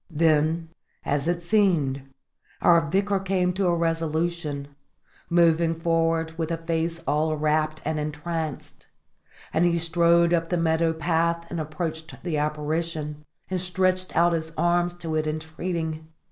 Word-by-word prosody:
Then, 160 0 +2 0.4
as 145 +1 0
it 175 0 0
seemed, 170 -9 +2 0.6
our 170 -1 +5
Vicar 200 +3 +1
came 185 -1 0
to 190 0 0
a 175 - +3
resolution, 165 -3 -1 0.6
moving 165 -1 +3
forward 165 -1 +1
with 160 -1 -1
a 165 - -1
face 165 0 -2
all 155 +2 +1
wrapt 155 +1 0
and 155 0 -1
entranced; 155 0 -5 0.7
and 160 - +3
he 170 -1 +3
strode 170 +1 +3
up 165 -1 +1
the 175 - +1
meadow 165 0 +2
path 170 +1 0
and 170 - -3
approached 160 +1 -5
the 160 -4 -1
apparition, 150 0 -2 0.3
and 185 -1 0
stretched 185 0 +1
out 170 0 +4
his 160 -1 -2
arms 175 0 +2
to 165 -2 -4
it 155 0 0
entreating. 160 0 -4
165 Hz, 140 wpm, -25 LUFS, 155-170 Hz, 0.7 s, our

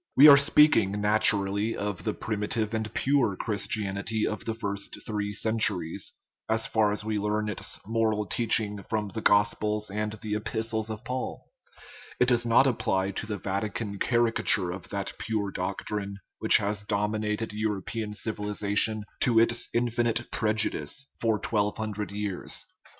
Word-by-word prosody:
We 145 +3 +10
are 145 - +11
speaking, 140 -8 +4
naturally, 105 0 +2
of 105 -2 -4
the - - -1
primitive 110 +1 -2
and 110 -1 -2
pure 135 -7 +1
Christianity 105 +1 -2
of 105 - -4
the 115 - -2
first 100 -3 -3
three 105 -2 -2
centuries, 100 -5 0 0.4
as 110 0 +1
far 110 -2 +2
as 105 0 -3
we 110 -1 -1
learn 105 +1 -1
its 105 - -4
moral 110 -1 0
teach 115 +4 +2
ing 105 -2 -5
from 105 -2 -1
the 110 +3 -5
gospels 105 0 +2
and 105 +1 -2
the 110 -1 -5
epistles 110 +1 -2
of 110 +2 -7
Paul; 125 +1 -4 0.7
it 125 - +4
does 120 -1 +2
not 115 +3 +5
apply 95 -6 0
to 110 - -5
the 105 -2 -3
Vatican 100 +1 -3
caricature 115 -6 +2
of 90 0 -8
that - - -4
pure 105 -3 -2
doc 95 +1 -4
trine 100 -1 -3 0.2
which - - +8
has 105 0 -2
dominated 105 +1 -2
European 105 0 -3
civilization, 105 0 0 0.2
to 120 -2 +2
its 115 +1 +3
infinite 120 0 0
prejudice, 110 - -1
for 115 -2 +1
twelve 105 -1 -1
hundred 105 -3 -4
years. 100 -2 -2
105 Hz, 150 wpm, -27 LUFS, 100-115 Hz, 0.7 s, are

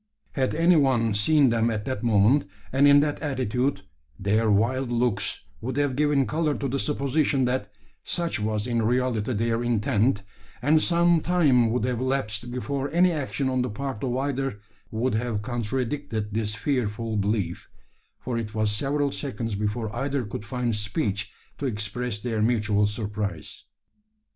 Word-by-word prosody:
Had 130 0 0
any 170 +2 +4
one 120 -6 +3
seen 135 +7 +4
them 115 0 +2
at 110 -2 -3
that 130 -6 -3
moment, 115 +2 +3 0.2
and 140 +2 +5
in 145 0 +7
that 145 0 -1
attitude, 130 -2 -1 0.3
their 110 +3 +1
wild 120 +5 +2
looks 120 -3 0 0.2
would 130 +3 -4
have 145 -3 +1
given 145 -1 +2
colour 155 0 0
to 140 - -2
the 135 +2 -1
supposition 140 -1 +1
that 125 +1 -1 0.3
such 170 -6 -1
was 105 0 -1
in 120 -2 0
reality 125 0 0
their 115 +1 0
intent; 115 -2 +1 0.4
and 155 +2 +3
some 170 -1 +4
time 145 -10 +3
would 115 -1 0
have 125 -1 -1
elapsed 120 -4 -1
before 135 +3 -3
any 175 +4 +4
action 140 -3 -2
on 130 -1 +1
the 125 - -1
part 135 +2 -5
of 125 -1 -1
either 135 -4 -2 0.3
would 115 +3 -1
have 110 -2 -1
contradicted 120 -1 -3
this 105 -1 -1
fearful 115 -2 -1
belief: 100 -4 -1 0.5
for 120 -2 -3
it 110 0 -6
was 110 -1 +1
several 140 +6 0
seconds 115 -6 -3
before 105 +2 -2
either 135 +1 -1
could 105 -1 -6
find 120 +1 -2
speech 105 -1 -2 0.3
to 140 - -1
express 105 +1 -2
their 110 0 -2
mutual 105 -2 +2
surprise. 105 -1 -4
120 Hz, 160 wpm, -25 LUFS, 105-140 Hz, 0.5 s, in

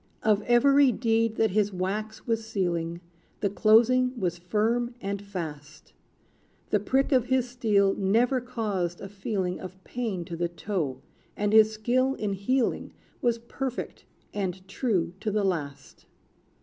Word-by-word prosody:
Of 215 -1 +3
every 275 +3 +5
deed 230 -1 +1
that 220 -2 +2
his 210 +1 +2
wax 200 +4 -3
was 225 -1 0
sealing, 175 -5 -2 0.4
The 200 - +1
closing 240 +4 +4
was 175 -2 -1
firm 230 +6 0
and 200 -1 -3
fast. 150 -7 -8 0.8
The 210 - +3
prick 265 +8 +1
of 255 -3 +3
his 260 -1 +2
steel 210 -5 +2
never 235 +6 +2
caused 200 -8 -2
a - - -7
feeling 195 -2 -3
Of 185 0 -10
pain 220 -8 -3
to 170 - -6
the 170 +1 -1
toe, 170 -7 -3 0.3
and 205 0 0
his 220 0 +7
skill 250 +5 +1
in 205 -2 -2
heeling 235 +6 0 0.3
Was 240 -1 +2
perfect, 250 +2 -5 0.3
and 190 -2 -3
true 190 -6 -1
to 220 - -2
the 210 0 0
last! 145 -7 -4
210 Hz, 145 wpm, -27 LUFS, 185-235 Hz, 0.8 s, his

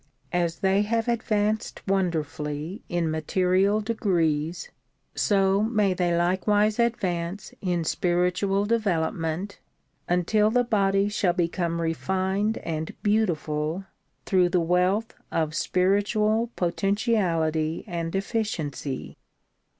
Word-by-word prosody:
As 170 0 0
they 195 0 +3
have 225 +2 0
advanced 215 -2 -1
wonderfully 160 -1 -2
in 170 -2 0
material 185 +6 +2
degrees 175 - -1 0.4
so 195 -1 +2
may 210 -3 +2
they 175 -1 +1
likewise 205 +5 +2
advance 190 -6 -1
in 175 -3 0
spiritual 180 +4 +1
develop 205 -8 +1
ment 165 +5 -4 0.5
until 195 +5 +3
the 245 +2 +3
body 200 -3 +2
shall 200 -3 +1
become 170 -1 -1
refined 190 +5 0
and 160 -1 -4
beautiful 170 -5 0 0.4
through 180 -2 +3
the 180 - +2
wealth 180 +6 +1 0.2
of 155 -2 0
spiritual 210 +6 +1
potentiality 170 -5 0
and 170 0 -4
efficiency. 195 - -3
185 Hz, 100 wpm, -26 LUFS, 170-210 Hz, 0.5 s, they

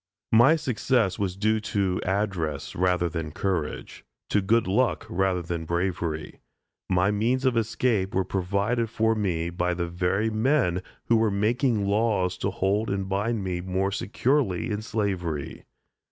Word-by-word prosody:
My 120 +8 +6
success 125 - 0
was 95 -3 -1
due 110 +2 +2
to 100 -3 -1
address 95 -7 -2
rather 90 -1 +2
than 80 -2 -4
courage; 85 -3 -3 0.3
to 105 - +3
good 115 +4 +2
luck 110 +8 +1
rather 95 -1 0
than 85 -1 -4
bravery. 85 -2 -2 0.5
My 90 +2 +3
means 120 +6 0
of 130 -2 +3
escape 115 -3 0
were 95 0 +2
provided 100 +5 0
for 110 0 +2
me 85 -6 -1
by 90 +1 -1
the 85 -1 -2
very 90 +5 0
men 110 - +2 0.2
who 115 - +4
were 110 -1 +3
making 110 +2 +1
laws 100 -3 +1
to 100 - 0
hold 100 +3 0
and 95 -1 -2
bind 105 +3 -1
me 90 -2 -2
more 95 +2 -1
securely 115 - 0
in 105 0 -2
slavery. 95 -9 -3
100 Hz, 150 wpm, -26 LUFS, 90-110 Hz, 0.5 s, My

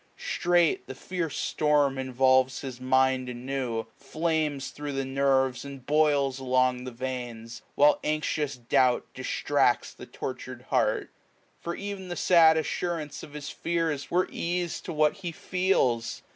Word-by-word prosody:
Straight 175 -2 +1
the 130 - -7
fierce 170 +1 -4
storm 145 -3 +1
involves 130 0 +2
his 130 -2 -7
mind 130 0 +2
anew, 125 -1 -3
n - - -14
oq - - -30
Flames 155 -1 -1
thro' 145 0 -6
the 135 -1 -2
nerves, 135 -1 +1
and 140 -2 -9
boUs 145 -3 +2
along 130 -1 +1
the 130 - -5
veins; 120 -2 -6
While 145 +1 +5
anxious 150 -2 -1
doubt 125 +1 +2
distracta - - 0
the - - -10
tortur'd - - -6
heart: - - +1 0.5
For 170 - -4
ev'n 200 -2 -6
the 175 - -4
sad 165 -3 +5
assurance 160 -1 -3
o£ - - -10
his 145 -1 -6
feara 165 -4 -1
Were 180 +1 +2
ease 175 0 -2
to - - -6
what 155 -1 +2
he 175 - -5
feels. 160 -11 0
140 Hz, 145 wpm, -27 LUFS, 130-160 Hz, 0.5 s, While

